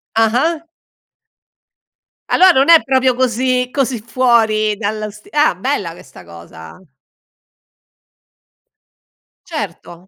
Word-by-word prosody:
Ah-ah. 250 +9 +1 1.7
Allora 375 0 +5
non 270 +1 +2
è 330 -1 +8
proprio 260 -1 +1
così, 250 0 0
così 260 -3 -2
fuori 220 -3 +1
dallo 215 0 -4
sti 210 +1 -17
ah, 300 - +2
bella 195 -4 -3
questa 135 - -15
cosa. 85 - -14 2.7
Certo. 175 +2 -7
230 Hz, 90 wpm, -16 LUFS, 205-260 Hz, 2.7 s, è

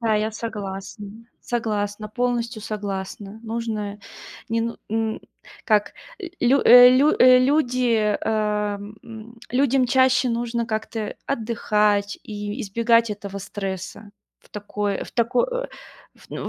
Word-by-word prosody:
Да, 225 -2 +1
я 215 +1 0
согласна 205 -2 -6 0.3
согласна, 215 -3 -3
полностью 240 -1 -2
согласна. 200 -1 -5
Нужно, 220 -3 -4 0.5
не 230 0 0
ну 230 0 -3
м, 220 0 -1 0.4
как 210 -2 +2 0.3
ль 380 - -7 0.2
лю 260 +3 +4
э, 245 +1 +10
лю 275 +4 +5
э, 255 0 +8
люди, 255 -3 +2 0.2
эм, 210 -1 -2
м, 230 +1 -11
людям 260 0 +2
чаще 260 0 +3
нужно 235 0 -2
как-то 220 -1 -4
отдыхать 210 -4 0
и 210 +2 -6
избегать 230 +2 +2
этого 200 -1 -6
стресса. 195 +1 -6 0.3
В - - -25
такое 205 -1 -3
в - - -13
тако 235 +1 +2
э, - - -3 0.5
в - - -21
ну - - -5
220 Hz, 125 wpm, -23 LUFS, 205-240 Hz, 0.5 s, э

